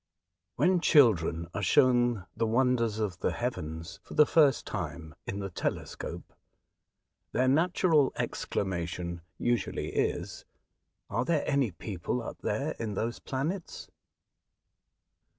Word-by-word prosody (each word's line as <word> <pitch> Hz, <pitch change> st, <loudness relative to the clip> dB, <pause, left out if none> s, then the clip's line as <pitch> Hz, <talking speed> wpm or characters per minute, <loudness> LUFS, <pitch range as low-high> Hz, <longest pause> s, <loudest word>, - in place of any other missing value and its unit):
WHEN 180 Hz, 0 st, +3 dB
children 85 Hz, -, +4 dB
are 100 Hz, -, -2 dB
shown 120 Hz, -2 st, +3 dB
the 115 Hz, 0 st, 0 dB
wonders 115 Hz, -2 st, +2 dB
of 105 Hz, -5 st, -2 dB
the -, -, 0 dB
heavens, 80 Hz, +2 st, -4 dB
for -, -, -11 dB
the 150 Hz, -, +7 dB
first 145 Hz, -4 st, +4 dB
time, 80 Hz, -2 st, -5 dB
in 100 Hz, -, -3 dB
the 100 Hz, -1 st, -4 dB
telescope, -, -, -4 dB, 1.0 s
their 130 Hz, +2 st, +2 dB
natural 160 Hz, 0 st, +3 dB
exclamation 85 Hz, -2 st, -3 dB, 0.2 s
usually 120 Hz, -1 st, -1 dB
is, -, -, -2 dB, 0.3 s
'' -, -, -52 dB
Are -, -, +1 dB
there 155 Hz, +2 st, +1 dB
any 140 Hz, -4 st, +2 dB
people 95 Hz, +5 st, -4 dB
up -, -, -7 dB
there 135 Hz, +9 st, -1 dB
in 110 Hz, -3 st, -3 dB
those 115 Hz, +4 st, -2 dB
planets 160 Hz, +8 st, -4 dB
115 Hz, 120 wpm, -29 LUFS, 90-135 Hz, 1.0 s, the